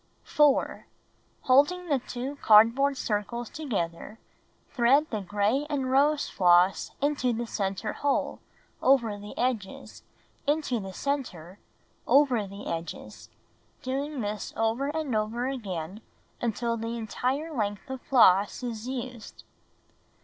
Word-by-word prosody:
4. 295 Hz, -2 st, +2 dB, 0.5 s
Holding 290 Hz, +8 st, +3 dB
the 285 Hz, -4 st, +1 dB
2 250 Hz, +3 st, -6 dB
cardboard 235 Hz, +5 st, +5 dB
circles 230 Hz, +1 st, -3 dB
together, 210 Hz, -, -4 dB, 0.5 s
thread 260 Hz, +5 st, +4 dB
the 215 Hz, -3 st, -2 dB
gray 205 Hz, +9 st, 0 dB
and 270 Hz, -3 st, -1 dB
rose 290 Hz, +2 st, +3 dB
floss 180 Hz, 0 st, +3 dB
into 285 Hz, -4 st, +1 dB
the 235 Hz, +1 st, -3 dB
center 200 Hz, -1 st, -3 dB
hole, 285 Hz, -1 st, -1 dB, 0.4 s
over 235 Hz, -6 st, +3 dB
the 205 Hz, +1 st, -10 dB
edges, 230 Hz, -6 st, -3 dB, 0.5 s
into 290 Hz, -5 st, 0 dB
the 195 Hz, -2 st, -7 dB
center, 190 Hz, -, -4 dB, 0.5 s
over 255 Hz, -7 st, +3 dB
the 200 Hz, +1 st, -10 dB
edges, 165 Hz, 0 st, -6 dB, 0.5 s
doing 275 Hz, +2 st, -3 dB
this 210 Hz, 0 st, -4 dB
over 225 Hz, +5 st, 0 dB
and 295 Hz, -4 st, -2 dB
over 220 Hz, +3 st, -1 dB
again 200 Hz, -7 st, -5 dB, 0.4 s
until 235 Hz, 0 st, -1 dB
the 230 Hz, +1 st, -4 dB
entire 260 Hz, +8 st, -2 dB
length 205 Hz, 0 st, -2 dB
of 265 Hz, -2 st, -6 dB
floss 205 Hz, -3 st, +4 dB
is 230 Hz, -1 st, -5 dB
used. 250 Hz, -3 st, -7 dB
240 Hz, 120 wpm, -27 LUFS, 210-275 Hz, 0.5 s, cardboard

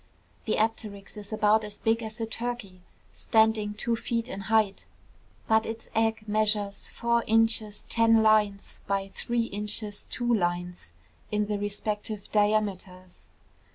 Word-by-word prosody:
The 215 Hz, -, +1 dB
apteryx 215 Hz, -2 st, -2 dB
is 210 Hz, 0 st, -8 dB
about 215 Hz, 0 st, +3 dB
as 210 Hz, -1 st, -6 dB
big 225 Hz, +1 st, +1 dB
as 220 Hz, +1 st, -7 dB
a 225 Hz, -, -1 dB
turkey, 225 Hz, -5 st, -4 dB, 0.3 s
standing 220 Hz, -2 st, +2 dB
two 230 Hz, +2 st, 0 dB
feet 230 Hz, +1 st, -2 dB
in 195 Hz, -, -5 dB
height; 215 Hz, -3 st, +2 dB, 0.6 s
but 220 Hz, 0 st, +4 dB
its 225 Hz, 0 st, -7 dB
egg 225 Hz, -1 st, 0 dB
measures 210 Hz, -1 st, 0 dB
four 235 Hz, 0 st, 0 dB
inches 225 Hz, -1 st, +2 dB
ten 225 Hz, -1 st, +4 dB
lines 210 Hz, -2 st, +2 dB
by 195 Hz, 0 st, -1 dB
three 235 Hz, +4 st, -1 dB
inches 210 Hz, -1 st, -3 dB
two 240 Hz, -1 st, +1 dB
lines 175 Hz, -, -2 dB, 0.4 s
in 210 Hz, 0 st, +1 dB
the 205 Hz, -1 st, -2 dB
respective 205 Hz, 0 st, -4 dB
diameters. 200 Hz, -4 st, -1 dB
215 Hz, 135 wpm, -27 LUFS, 205-225 Hz, 0.6 s, but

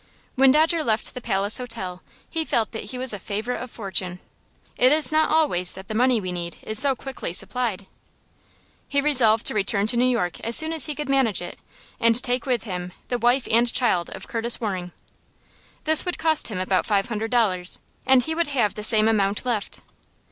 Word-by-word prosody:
When 265 Hz, 0 st, +4 dB
Dodger 320 Hz, +3 st, +2 dB
left 220 Hz, -4 st, -1 dB
the 250 Hz, -, -7 dB
Palace 205 Hz, 0 st, 0 dB
Hotel 210 Hz, -8 st, -6 dB, 0.3 s
he 325 Hz, -, -3 dB
felt 230 Hz, -7 st, -1 dB
that 225 Hz, -, -6 dB
he 230 Hz, +5 st, -7 dB
was 255 Hz, -2 st, -1 dB
a 205 Hz, -, -5 dB
favorite 215 Hz, +6 st, -4 dB
of 250 Hz, -, -7 dB
fortune. 190 Hz, -5 st, -4 dB, 0.6 s
It 255 Hz, +1 st, +4 dB
is 310 Hz, +1 st, +4 dB
not 310 Hz, 0 st, +2 dB
always 280 Hz, -, +1 dB
that 190 Hz, 0 st, -11 dB
the -, -, -3 dB
money 245 Hz, +1 st, +2 dB
we 185 Hz, -3 st, -5 dB
need 170 Hz, -1 st, -6 dB
is 215 Hz, 0 st, +2 dB
so 275 Hz, -2 st, +4 dB
quickly 270 Hz, -8 st, -7 dB
supplied. 210 Hz, 0 st, -2 dB, 1.0 s
He 280 Hz, -, +1 dB
resolved 250 Hz, -7 st, +4 dB
to -, -, +1 dB
return 200 Hz, -1 st, +1 dB
to 235 Hz, +2 st, +1 dB
New 250 Hz, +1 st, +3 dB
York 180 Hz, -8 st, -1 dB
as 230 Hz, 0 st, +1 dB
soon 315 Hz, +1 st, +3 dB
as 320 Hz, -3 st, +2 dB
he 300 Hz, -, -4 dB
could 295 Hz, -1 st, -5 dB
manage 265 Hz, -7 st, +1 dB
it, 175 Hz, -, -8 dB, 0.4 s
and 230 Hz, 0 st, +3 dB
take 250 Hz, +1 st, +2 dB
with 245 Hz, -3 st, 0 dB
him 180 Hz, -4 st, -6 dB, 0.2 s
the 245 Hz, -, -1 dB
wife 245 Hz, +2 st, +2 dB
and 235 Hz, +1 st, +3 dB
child 185 Hz, -9 st, +1 dB
of -, -, -10 dB
Curtis 235 Hz, 0 st, +1 dB
Waring. 185 Hz, -6 st, -4 dB, 0.9 s
This 315 Hz, 0 st, +4 dB
would 360 Hz, -1 st, -4 dB
cost 315 Hz, -1 st, +1 dB
him 210 Hz, -5 st, -5 dB
about 185 Hz, 0 st, 0 dB
five 200 Hz, -1 st, 0 dB
hundred 225 Hz, 0 st, -3 dB
dollars, 195 Hz, -7 st, 0 dB, 0.2 s
and 260 Hz, -1 st, +4 dB
he 320 Hz, -, -3 dB
would 335 Hz, 0 st, -1 dB
have 245 Hz, -8 st, 0 dB
the 210 Hz, -, -7 dB
same 215 Hz, 0 st, +5 dB
amount 205 Hz, 0 st, 0 dB
left. 230 Hz, -5 st, -3 dB
230 Hz, 205 wpm, -23 LUFS, 200-260 Hz, 1.0 s, same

